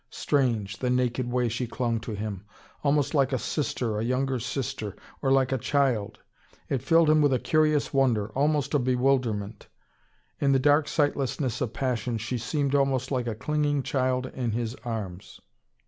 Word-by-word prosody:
Strange, 115 -8 0
the 125 - -1
naked 125 0 0
way 125 -1 +1
she 120 +2 -2
clung 115 0 -1
to 110 0 -6
him! 105 -2 -5 0.4
Almost 145 0 +2
like 140 -2 +3
a 130 - +1
sister, 120 -5 -2
a - - -1
younger 130 +2 0
sister! 115 -4 -4 0.3
Or 135 - +1
like 135 -1 +3
a 130 - 0
child! 120 -6 0 0.5
It 135 - 0
filled 165 +4 +4
him 155 0 +5
with 145 -2 +4
a - - +3
curious 155 +2 +1
wonder, 120 -6 +2
almost 145 +5 0
a 145 - +4
bewilderment. 125 -5 0 0.7
In 140 -1 +3
the - - +5
dark 145 +2 +4
sightlessness 135 -4 0
of 120 -3 -2
passion, 125 -2 -1
she 115 +3 -3
seemed 140 +3 -1
almost 135 -2 +1
like 125 -3 -1
a 115 - -2
clinging 145 +2 0
child 130 -3 0
in 125 -3 -3
his 115 0 -2
arms. 105 -6 -6
130 Hz, 170 wpm, -27 LUFS, 115-140 Hz, 0.7 s, him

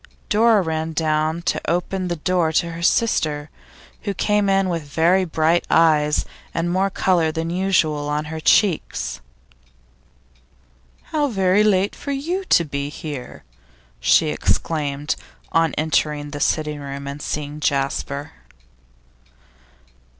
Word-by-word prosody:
Dora 220 -1 +4
ran 160 -1 -2
down 155 +1 0
to - - 0
open 180 +2 -1
the 175 - -1
door 170 0 +1
to 170 +2 +1
her 165 +1 -7
sister, 155 -7 +1 0.5
who 200 -2 -3
came 210 +1 +1
in 195 0 +3
with 170 -2 -1
very 165 +6 +2
bright 160 +1 +2
eyes 150 -2 +3 0.3
and 170 +1 0
more 190 +2 +1
colour 175 -4 +1
than 165 +1 -3
usual 170 -6 +1
on 150 +1 -1
her 160 +1 -5
cheeks. 180 +1 +1 1.9
'How 300 -2 +1
late 195 -2 +2
for 280 - -5
you 335 +8 -2
to 170 - +4
be 140 -1 -3
here!' 145 -3 -7 0.6
she - - +4
exclaimed, 145 -2 -1 0.4
on 165 -1 +2
entering 150 -1 0
the 145 - -5
sitting 150 0 0
room 140 0 -6
and 140 +1 -6
seeing 150 0 -4
Jasper. 140 +1 -1
160 Hz, 125 wpm, -21 LUFS, 150-185 Hz, 1.9 s, Dora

